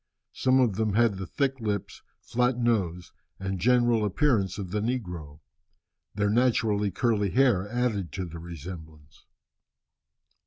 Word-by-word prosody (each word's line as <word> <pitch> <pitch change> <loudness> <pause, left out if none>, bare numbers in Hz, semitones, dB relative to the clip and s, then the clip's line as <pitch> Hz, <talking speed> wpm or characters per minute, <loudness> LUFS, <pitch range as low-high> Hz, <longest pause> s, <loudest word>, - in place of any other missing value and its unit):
Some 130 0 +3
of 115 -7 +2
them 110 -2 0
had 115 -3 +3
the 95 - -5
thick 135 - -1
lips, 105 -3 -3 0.2
flat 125 +1 0
nose, 95 -8 0 0.3
and 95 -1 -3
general 120 +1 +3
appearance 105 -1 +1
of 95 -4 -6
the 105 - 0
negro. 90 - -4 0.7
Their 105 0 +1
naturally 110 -3 +2
curly 105 +1 +1
hair 110 -5 +2
added 110 - -1
to 95 -1 -3
the 85 -1 -8
resemblance. 80 -3 -10
105 Hz, 130 wpm, -27 LUFS, 90-120 Hz, 0.7 s, Some